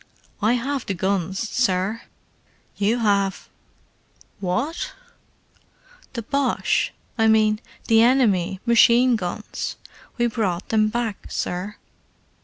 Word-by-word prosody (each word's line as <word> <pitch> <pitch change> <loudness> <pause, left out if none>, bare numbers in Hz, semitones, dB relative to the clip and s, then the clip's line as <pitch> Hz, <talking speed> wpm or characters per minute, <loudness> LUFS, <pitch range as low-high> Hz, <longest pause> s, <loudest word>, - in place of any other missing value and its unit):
"I 215 +3 +3
have 265 +2 -2
the 195 - -1
guns, 190 0 -1
sir." 215 -2 0 0.7
"You 210 +4 +1 1.4
have—what?" 200 - -2 1.2
"The 235 -3 -4
Boche—I 255 -3 0
mean, 215 -1 +4 0.3
the 225 -2 +5
enemy, 205 -7 +3
machine 235 +1 +5
guns. 180 -5 -4 0.4
We 240 - +2
brought 210 -6 -2
them 215 -1 +3
back, 225 -2 -3
sir." 185 +4 -3
220 Hz, 90 wpm, -23 LUFS, 195-240 Hz, 1.4 s, the